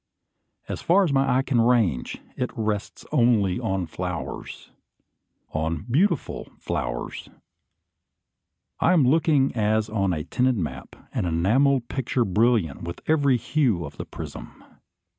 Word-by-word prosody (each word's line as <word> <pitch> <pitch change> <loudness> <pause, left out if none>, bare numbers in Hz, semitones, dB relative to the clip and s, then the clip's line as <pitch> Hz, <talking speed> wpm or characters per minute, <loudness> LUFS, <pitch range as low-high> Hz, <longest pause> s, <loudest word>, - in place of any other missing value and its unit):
As - - -5
far 195 +4 +4
as 160 -7 0
my 135 -2 +3
eye 135 - +2
can 125 -4 +2
range, 115 - +1
it 125 - -2
rests 105 -2 -3
only 110 -7 +3
on 95 -2 -1
flowers, 80 - -6 0.8
on 80 +3 -2
beautiful 175 - 0
flowers! - - -4 1.5
I - - +4
am 155 -7 +4
looking 150 -2 +3
as 110 0 +1
on 100 -3 +1
a 75 -3 -2
tinted 125 +7 +1
map, 85 -6 -5 0.2
an - - -1
enamelled 120 +10 +2
picture 125 -2 -1
brilliant 105 - +1
with 85 0 -6
every 145 -5 +3
hue 120 - 0
of 75 0 -10
the - - -5
prism. - - -9
115 Hz, 130 wpm, -25 LUFS, 95-135 Hz, 1.5 s, far